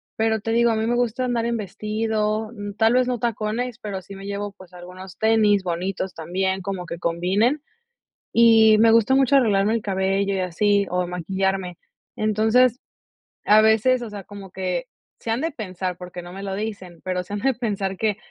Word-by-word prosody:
Pero 220 0 +1
te 225 +2 -3
digo, 235 0 +3
a - - 0
mí 220 +1 -1
me 240 - +1
gusta 245 +1 0
andar 235 -2 -1
en 235 0 0
vestido, 215 +1 -2
mm, 205 -3 -7
tal 225 +2 +4
vez 255 0 +3
no 245 -2 -1
tacones, 230 +1 -2
pero 205 -5 -5
sí 195 +1 -11
me 195 0 -10
llevo, 200 0 -4
pues, 185 -2 -16
algunos 180 +1 -11
tenis 215 -3 +3
bonitos 185 +2 -3
también, 190 +3 -2
como 185 -2 -4
que 170 - -5
combinen, 190 - +1 0.7
y 225 -2 +6
me 225 +1 +6
gusta 230 +3 +4
mucho 270 +1 +4
arreglarme 215 -3 +3
el 225 - -1
cabello 195 0 0
y - - -1
así, 200 +3 +1
o, 180 0 0
maquillarme. 190 +1 -2 0.4
Entonces, 220 +4 +2 0.7
a 215 +1 +6
veces, 220 +4 +3
o 235 - -6
sea, 205 -2 -8
como 200 -2 -11
que 180 -2 -3 0.3
si 230 - -7
han 225 - +1
de 325 +4 -2
pensar 185 - -5
porque 180 -1 -8
no 175 +1 -11
me 195 +1 -7
lo 195 - -4
dicen, 195 -4 -6
pero 180 -1 -2
se 185 - -15
han 205 - -2
de 270 +5 +1
pensar 205 -5 -2
de 190 - -8
que: 215 -2 0
205 Hz, 200 wpm, -23 LUFS, 190-225 Hz, 0.7 s, y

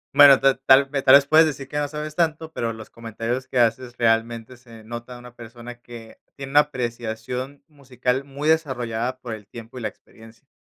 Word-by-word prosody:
Bueno, 140 -2 +8
tal 135 -2 +2
tal 135 +1 +6
tal 135 -2 +3
vez 140 0 +6
puedes 155 +2 +5
decir 140 -3 -6
que 145 +2 -3
no 145 - -1
sabes 150 +1 -7
tanto, 160 -1 -1
pero 115 -1 -2
los 110 -1 -11
comentarios 115 +3 -5
que 130 - -5
haces 120 +1 0
realmente 115 +1 0
se 115 -3 -15
nota 120 +2 -8
de 120 - -11
una 120 0 -14
persona 120 +1 -11
que 115 -2 -13 0.2
tiene 135 -1 -8
una 145 - +6
apreciación 125 0 -4
musical 130 -3 -3
muy 140 +2 -6
desarrollada 130 -6 -1
por 120 -3 -7
el 105 -2 -10
tiempo, 115 +2 -11
y - - -9
la - - -2
experiencia. 115 +4 -16
125 Hz, 200 wpm, -22 LUFS, 115-140 Hz, 0.2 s, Bueno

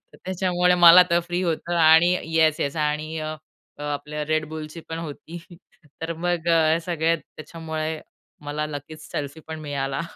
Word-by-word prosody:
तर - - -15
त्याच्यामुळे 180 -1 +1
मला 175 0 +9
तर 170 - +3
फ्री 175 +1 -2
होतं 170 0 -2
आणि 165 +2 +6 0.2
येस-येस 155 -2 +2
आणि 155 +1 -2 0.6
आपल्या 150 +1 -4
Red 155 0 +1
Bullची 155 +1 -7
पण 165 0 -4
होती 165 +1 -8 0.6
तर 165 +1 -2
मग 175 0 -2 0.4
सगळ्या 165 -1 +1
त्याच्यामुळे 160 0 -6 0.4
मला 150 +1 -3
लकीच, 150 +1 -8
सेल्फीपण 160 +2 -6
मिळाला. 140 -1 -3
160 Hz, 130 wpm, -24 LUFS, 150-170 Hz, 0.6 s, मला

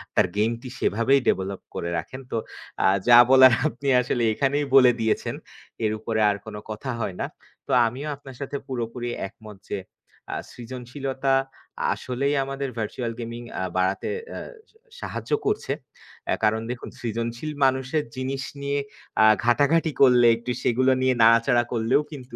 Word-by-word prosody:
তার - - +4
গেম 110 +2 +2
টি 130 - -8
সেভাবেই 115 +6 +3
ডেভেলপ 95 +1 -1
করে 85 - -3
রাখেন।" 130 +11 -6
তো 115 - -1 0.5
আ - - +6 0.2
যা 120 0 +9
বলার 130 -1 +8
আপনি 140 -1 -6
আসলে 120 -1 -1
এখানেই 140 +4 0
বলে 130 -2 +8
দিয়েছেন। 110 -1 0 0.5
এর 105 - +1
উপরে 110 0 -2
আর 100 - -3
কোন 110 -1 -8 0.2
কথা 110 +5 -4
হয় 95 -4 -3
না। - - -1 0.4
তো - - -4 0.2
আমিও 130 +6 -5
আপনার 135 -2 -12
সাথে 140 0 -3
পুরোপুরি 120 -1 -4 0.2
একমত 105 +1 -13
যে - - -2 0.6
আ - - -2 0.2
সৃজনশীলতা, 130 +2 -3 0.6
আসলেই 140 +3 -1
আমাদের 135 0 -4
ভার্চুয়াল 115 +2 -3
গেমিং 115 0 -6 0.2
আ - - -1
বাড়াতে 95 +1 0 0.2
এ্যা - - -6 0.3
সা 445 - -27 0.2
সাহায্য - - -6
করছে। 420 - -1 0.6
এ্যা - - +1
কারণ 110 +1 +2
দেখুন 125 - -6
সৃজনশীল 115 +5 -3
মানুষের 130 +3 +1
জিনিস 135 +1 -3 0.2
নিয়ে 140 0 -1 0.4
আ - - +7 0.2
ঘাটাঘাটি 145 +7 +3
করলে, 125 -3 +7
একটু 120 +2 -5
সেগুলো 130 +2 +3
নিয়ে 130 0 +3
নাড়াচাড়া 115 +1 +5
করলেও 115 +5 +2
কিন্তু 130 -3 -9
125 Hz, 155 wpm, -24 LUFS, 115-135 Hz, 0.6 s, যা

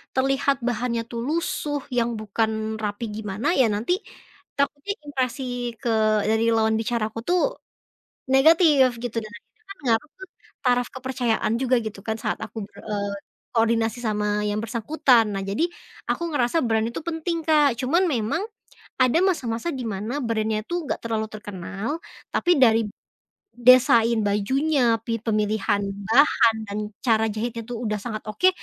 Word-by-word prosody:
terlihat 270 +1 +1
bahannya 240 0 -1
tuh 235 - -5
lusuh, 295 -1 -1
yang 235 -2 0
bukan 220 +1 -1
rapi 215 +1 -3
gimana, 220 - -1
ya 260 - +5
nanti 215 +11 0 0.7
takutnya, 285 +6 0 0.2
impresi 260 -2 -2 0.4
ke 245 - -1 0.4
dari 220 +1 +2
lawan 220 0 +2
bicara 225 -1 -1
aku 225 - -7
tuh, 355 +7 +2 1.0
negatif, 275 -4 +5
gitu. 235 -1 -5
Dan 215 - -9
akhirnya 220 - -16
kan 395 - -8
ngaruh 240 +6 +1
ke - - -6 0.4
taraf 245 -1 +3
kepercayaan 245 -4 -1
juga, 255 -1 +3
gitu 205 -2 -6
kan, 220 +1 -2
saat - - -2
aku 220 - -9
ber, - - -19
eee, 205 -1 -3 0.4
koordinasi 225 +1 +2
sama 210 -2 0
yang 205 +1 -1
bersangkutan. 235 +2 +3
Nah, 195 - -2
jadi, 200 +11 0 0.5
aku - - -1
ngerasa 255 +2 +1
brand 220 -1 +1
itu 235 - -5
penting, 330 0 -3
Kak. 295 -5 +4
Cuman 330 +9 +2
memang, 255 +2 0 0.6
ada 255 +3 +4
masa-masa 270 -7 0
di 265 -4 -5
mana 215 +7 -3
brand-nya 220 -4 -1
tuh 345 0 -2
nggak - - -2
terlalu 220 -1 -1
terkenal, 205 0 -6 0.4
tapi 350 -4 +3
dari 230 -3 +5 0.7
desain 235 -2 +5
bajunya, 245 +4 +2
pi 230 -1 -1
pemilihan 210 -2 +1 0.3
bahan, 230 -2 +5
dan 200 - -4 0.3
cara 220 -2 +3
jahitnya 230 +2 -3
tuh 240 - -4
udah 210 -1 -1
sangat 215 -1 -5
oke, 215 - +4
235 Hz, 150 wpm, -24 LUFS, 220-270 Hz, 1.0 s, ya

